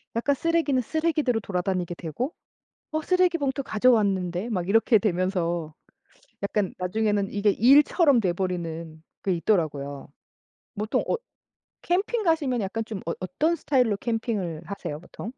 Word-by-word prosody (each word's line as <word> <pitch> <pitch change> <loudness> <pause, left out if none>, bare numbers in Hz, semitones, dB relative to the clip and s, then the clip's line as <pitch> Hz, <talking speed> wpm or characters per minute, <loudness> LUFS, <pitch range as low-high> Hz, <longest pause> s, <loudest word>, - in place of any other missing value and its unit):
약간 260 +5 +2
쓰레기는 320 -4 +1
쓰레기대로 305 -4 0
돌아다니게 180 -2 -2
되고 210 - -4 0.6
"어 310 0 -1
쓰레기 365 0 +2
봉투 275 -1 -1
가져왔는데?" 205 -5 +2
막 180 -5 -2
이렇게 225 +2 +4
되면서 175 -5 -1 0.7
약간 200 -1 0
나중에는 205 +2 0
이게 205 +1 +2
일처럼 280 - +5
돼 185 -4 +1
버리는 165 -3 -4 0.2
게 190 - +1
있더라고요. 155 -7 -1 0.7
보통 215 +1 0
엇 475 - 0 0.6
캠핑 400 +6 0
가시면 310 - +1
약간 220 +3 -2
좀 215 -3 -6
어 165 - 0
어떤 315 - 0
스타일로 250 -10 +2
캠핑을 215 -8 -2
하세요, 180 -5 -5
보통? 215 +6 -8
210 Hz, 325 characters per minute, -26 LUFS, 180-270 Hz, 0.7 s, 일처럼